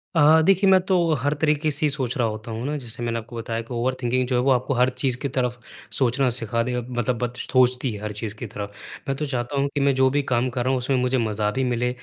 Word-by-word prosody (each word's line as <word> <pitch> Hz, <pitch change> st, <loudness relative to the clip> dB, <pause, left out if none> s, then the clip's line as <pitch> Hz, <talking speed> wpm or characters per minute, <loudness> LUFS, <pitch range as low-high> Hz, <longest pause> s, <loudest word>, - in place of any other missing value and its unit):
अ, 160 Hz, +1 st, +6 dB
देखिए 195 Hz, +1 st, +4 dB
मैं 190 Hz, -1 st, +7 dB
तो 190 Hz, -, +4 dB, 0.2 s
हर 145 Hz, +4 st, +1 dB
तरीक़े 155 Hz, 0 st, +2 dB
से 155 Hz, +3 st, +1 dB
ही -, -, +3 dB
सोच 135 Hz, -3 st, -2 dB
रहा 120 Hz, -, +2 dB
होता 110 Hz, +2 st, -6 dB
हूँ 115 Hz, +3 st, -4 dB
ना 150 Hz, -, -2 dB
जैसे 120 Hz, -2 st, -6 dB
मैंने 115 Hz, 0 st, -1 dB
आपको 115 Hz, +1 st, -11 dB
बताया 115 Hz, 0 st, -3 dB
कि 115 Hz, +2 st, -9 dB
ओवर 120 Hz, +2 st, 0 dB
थिंकिंग 125 Hz, +1 st, 0 dB
जो 125 Hz, -, 0 dB
है 125 Hz, -, +3 dB
वो 135 Hz, +2 st, +3 dB
आपको 130 Hz, +2 st, +1 dB
हर 125 Hz, 0 st, +3 dB
चीज़ 130 Hz, -3 st, +1 dB
की 140 Hz, -, -2 dB
तरफ़ 125 Hz, -1 st, 0 dB, 0.4 s
सोचना 130 Hz, +1 st, +2 dB
सिखा 115 Hz, -1 st, -1 dB
दे 125 Hz, +1 st, -3 dB
अब 120 Hz, -, -11 dB
मतलब 120 Hz, +1 st, 0 dB
बत 120 Hz, 0 st, -3 dB
सोचती 125 Hz, 0 st, +2 dB
है 105 Hz, -1 st, -7 dB
हर 105 Hz, 0 st, -4 dB
चीज़ 105 Hz, -2 st, -4 dB
की -, -, -4 dB
तरफ़। 100 Hz, 0 st, -6 dB, 0.4 s
मैं 135 Hz, -, 0 dB
तो 150 Hz, -, -2 dB
चाहता 130 Hz, 0 st, -3 dB
हूँ 140 Hz, -, +2 dB
कि -, -, +1 dB
मैं 140 Hz, 0 st, +3 dB
जो 130 Hz, 0 st, +4 dB
भी 145 Hz, +2 st, +1 dB
काम 120 Hz, +2 st, +1 dB
कर 125 Hz, 0 st, -2 dB
रहा 130 Hz, -, +1 dB
हूँ 130 Hz, -, +1 dB
उसमें 130 Hz, +2 st, 0 dB
मुझे 125 Hz, +1 st, +1 dB
मज़ा 105 Hz, -3 st, 0 dB
भी 130 Hz, +4 st, -1 dB
मिले, 125 Hz, -1 st, 0 dB
125 Hz, 285 wpm, -23 LUFS, 120-135 Hz, 0.4 s, मैं